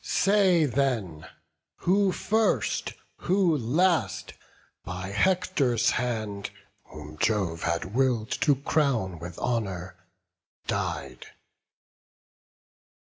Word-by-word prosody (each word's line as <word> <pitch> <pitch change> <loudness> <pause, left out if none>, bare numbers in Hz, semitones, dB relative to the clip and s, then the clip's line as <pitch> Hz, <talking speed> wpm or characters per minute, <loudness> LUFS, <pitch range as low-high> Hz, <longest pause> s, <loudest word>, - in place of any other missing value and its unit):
Say 190 -5 +3
then, 115 - -1 0.5
who 195 +2 +3
first, 220 +4 0 0.2
who 180 -3 +2
last, 160 +8 +1 0.5
by 90 +1 -5
Hector's 125 - +2
hand, 110 -5 -2 0.4
Whom 75 0 -11
Jove 95 -7 0
had 85 +3 -2
will'd 125 -3 +1
to 145 - +4
crown 130 - 0
with 85 0 -8
honour, 95 -7 -2 0.7
died. - - -3
120 Hz, 80 wpm, -27 LUFS, 95-160 Hz, 0.7 s, to